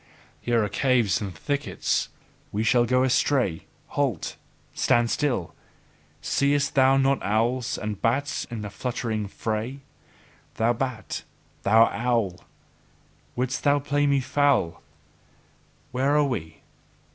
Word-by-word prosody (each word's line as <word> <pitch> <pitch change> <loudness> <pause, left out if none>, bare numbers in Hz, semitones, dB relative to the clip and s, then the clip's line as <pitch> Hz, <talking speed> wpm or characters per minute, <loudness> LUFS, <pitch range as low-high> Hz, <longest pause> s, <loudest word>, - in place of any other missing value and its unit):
Here 120 -2 +1
are - - 0
caves 120 -2 +2
and 100 -2 -4
thickets: 140 - -1 0.4
we 105 +2 -1
shall 120 +1 +4
go 125 +2 +2
astray! 130 - +1 0.2
Halt! 135 - -1 0.4
Stand 120 -1 +2
still! 125 - -1 0.7
Seest 140 0 +1
thou 135 0 +5
not 135 0 +2
owls 115 +4 0
and 105 -2 -5
bats 135 +5 0
in 110 -3 -6
fluttering 110 0 -3
fray? 110 +6 -4 0.7
Thou 115 +2 +2
bat! 125 -2 -4 0.4
Thou 110 +3 +6
owl! 115 -5 0
Thou 90 - -19 0.9
wouldst 125 +1 -1 0.2
play 145 0 +1
me 140 -1 +3
foul? 130 - +1 1.1
Where 135 +4 +2
are 150 - +4
we? 85 - -4
120 Hz, 115 wpm, -25 LUFS, 110-135 Hz, 1.1 s, Thou